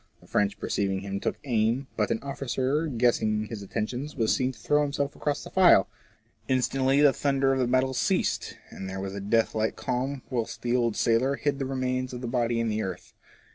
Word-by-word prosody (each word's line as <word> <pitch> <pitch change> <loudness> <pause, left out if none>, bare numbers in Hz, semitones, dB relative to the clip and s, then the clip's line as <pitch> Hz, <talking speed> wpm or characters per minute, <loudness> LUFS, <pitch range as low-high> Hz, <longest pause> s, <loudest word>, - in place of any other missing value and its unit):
The - - -20
French 100 0 0
perceiving 95 -1 -1
him 100 0 -4
took - - -2
aim, 120 0 +1
but 105 - 0
an 115 - -1
officer 140 +2 -1
guessing 115 -4 +1
his 110 -1 -7
intentions, 120 +8 -4
was 115 -5 +2
seen 130 0 0
to - - -16
throw 150 0 +2
himself 140 -1 -1
across 145 -1 -2
the - - -10
file. 180 - +6 0.6
Instantly 130 +1 +2
the 145 -2 +6
thunder 135 -1 +1
of 135 - 0
the 125 - +2
battle 130 +1 +2
ceased, - - 0
and 95 - -7
there 95 0 -5
was 95 0 -4
a 100 - -5
death 110 +3 +1
like 110 0 0
calm 130 +2 -2
whilst 120 -3 -3
the 120 0 +1
old 120 -3 +1
sailor 125 +4 +2
hid 140 0 -1
the 135 - -1
remains 130 -1 -2
of 125 - -6
lOi 120 - -3
FORECASTLE - - -6
TRAITS. 120 -2 +1
the 120 - 0
body - - 0
in 115 -1 0
the 110 0 -1
earth. 95 -4 -6
125 Hz, 220 wpm, -27 LUFS, 110-135 Hz, 0.6 s, file